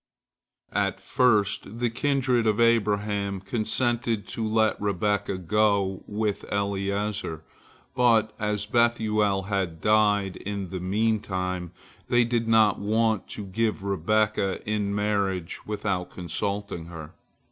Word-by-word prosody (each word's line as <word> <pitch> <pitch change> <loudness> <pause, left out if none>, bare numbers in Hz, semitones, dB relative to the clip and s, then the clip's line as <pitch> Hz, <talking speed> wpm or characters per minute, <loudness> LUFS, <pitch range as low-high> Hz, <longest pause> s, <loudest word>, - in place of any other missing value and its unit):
At - - 0
first 105 -3 +1
the 120 -2 +1
kindred 130 -2 +1
of 105 0 +2
Abraham 105 -3 +1
consented 115 +1 -1
to 115 - -3
let 110 -1 +1
Rebekah 100 0 0
go 100 +1 +1
with 105 -1 -2
Eliezer, 100 -4 -2 0.5
but 115 -3 +3
as 105 0 -1
Bethuel 110 -3 +2
had 95 -5 -2
died 105 -2 +2
in 100 -3 -5
the 95 - -3
meantime, 95 -3 -1 0.4
they 120 0 +4
did 115 -1 0
not 110 -3 +4
want 110 0 +1
to 105 - -5
give 105 +1 -1
Rebekah 100 +1 0
in 105 -1 -1
marriage 100 -4 -1
without 100 -4 -2
consulting 100 0 -4
her. 80 -2 -9
105 Hz, 115 wpm, -26 LUFS, 95-110 Hz, 0.5 s, they